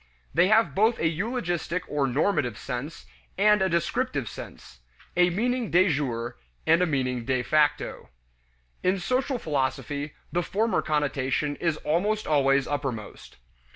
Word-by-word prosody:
They 175 +3 +4
have 215 -7 +4
both 220 +7 +3
a 160 - +1
eulogistic 175 -2 -2
or 145 -2 0
normative 130 - 0
sense, 135 +6 -6 0.3
and 210 +1 +4
a 190 - +2
descriptive 170 - -1
sense; 65 -9 -10 0.4
a 180 0 +5
meaning 240 +5 -1
de 185 +2 +4
jure 125 -6 -2 0.3
and 165 +2 +4
a 180 - +3
meaning 130 -5 -1
de 130 +1 0
facto. 150 +1 +1 0.7
In 185 +2 +2
social 255 +8 0
philosophy, 145 - -2 0.2
the 175 - +1
former 220 +6 0
connotation 145 -1 0
is 165 -3 0
almost 205 +9 0
always 135 -2 +3
uppermost. 135 -7 -5
155 Hz, 135 wpm, -26 LUFS, 140-195 Hz, 0.7 s, a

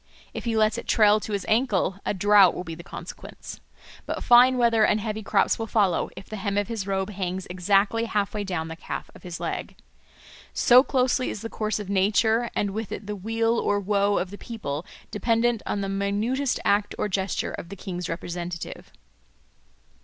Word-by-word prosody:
If - - -6
he 230 -1 0
lets 215 +1 +2
it - - -10
trail 210 -1 +5
to 215 - -7
his 200 -2 -2
ankle, 215 -5 +1
a - - +1
drought 200 -1 +5
will - - -4
be 165 - -7
the 165 - -9
consequence. 170 - -9 0.5
But - - -3
fine 250 +1 +6
weather 230 -2 +4
and 215 - +3
heavy 215 0 -3
crops 200 +1 +1
will 225 - -3
follow 200 -6 +1
if - - -9
the 215 - -6
hem 200 0 -2
of 205 +2 0
his 220 -4 -4
robe 195 +1 -1
hangs 185 -1 -3
exactly 200 +5 +2
half 205 -3 -1
way 210 -1 -2
down 180 -5 -3
the 165 - -6
calf - - -6
of - - -15
his 175 -1 -7
leg. - - -4 0.8
So 250 +1 +7
closely 255 -1 +1
is 205 - -5
the 225 - -4
course 215 -2 -2
of 205 - -6
nature, 220 +4 +2
and 205 - 0
with 220 +1 -5
it 200 - -6
the 210 +1 -4
weal 225 +3 0
or 205 0 +1
woe 200 0 +1
of 180 - -2
the 205 - -9
people, 170 -9 -5 0.2
dependent 230 +2 +1
on 200 - -1
the 195 - -2
minutest 205 +7 -1
act 205 0 +2
or - - 0
gesture 190 -1 -2
of 170 - -7
the 200 - -7
king's 180 -2 -5
representative. 175 0 -6
205 Hz, 200 wpm, -25 LUFS, 190-225 Hz, 0.8 s, So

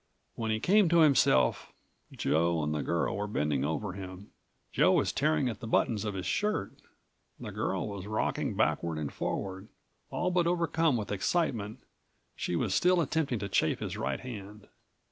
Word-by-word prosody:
When 110 -1 -3
he 110 0 +1
came 195 - +4
to 170 0 +5
himself, 135 - +3 0.4
Joe 85 0 +1
and 75 +1 -1
the 75 - -1
girl174 85 +4 0
were 105 +1 -2
bending 75 -8 0
over 80 +6 -2
him. 95 +1 -9 0.4
Joe - - +4
was - - +2
tearing 80 +10 +1
at 110 -4 -4
the 115 - -7
buttons 110 -1 +1
of 105 -2 -3
his 95 - -4
shirt. 210 - -1 0.7
The - - -6
girl 95 +2 -2
was 100 -2 -6
rocking 110 +1 -1
backward 80 +2 0
and 75 -2 -4
forward. 95 +1 -4 0.4
All 180 - -1
but 175 -1 +2
overcome 165 -4 +2
with 105 -2 -4
excitement, 110 - -1 0.5
she 90 - -2
was 95 +3 0
still 180 - +4
attempting 150 -4 0
to 100 - -4
chafe 95 - +1
his - - -5
right - - -2
hand. 105 -4 -9
105 Hz, 170 wpm, -30 LUFS, 90-140 Hz, 0.7 s, to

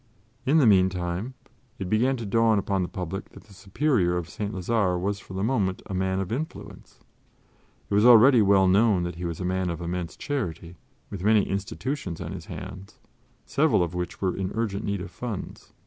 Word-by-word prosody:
In 150 +4 +4
the 150 - +5
meantime 95 +3 +2 0.4
it 95 - -4
began 125 +7 +2
to 115 - -5
dawn 115 +1 +3
upon 100 -1 0
the 90 - -1
public 95 +2 -5
that - - -13
the 105 - -18
Superior 95 -3 0
of 85 -2 -4
St. 105 0 -4
Lazare 95 -2 0
was 100 +2 -2
for 95 - -11
the 95 - -2
moment 105 -6 0
a - - -7
man 95 0 0
of 95 0 -3
influence. 150 +7 -7 0.9
It - - -5
was 105 +1 +4
already 120 +1 +8
well 100 -2 +4
known 100 -1 +4
that 85 -1 -5
he 90 - -5
was 85 -2 -4
a 90 - -3
man 95 0 -1
of 85 -1 -4
immense 85 0 -4
charity, 90 - -4 0.4
with 95 -3 -6
many 105 0 +4
institutions 100 - -4
on - - -5
his - - -8
hands, 95 +3 -9 0.5
several 145 - +2
of 85 0 -4
which 90 -1 -4
were 95 -2 +1
in 95 -1 -2
urgent 110 -3 -2
need 100 -2 -2
of 95 0 -7
funds. 110 +2 -7
95 Hz, 195 wpm, -26 LUFS, 90-110 Hz, 0.9 s, already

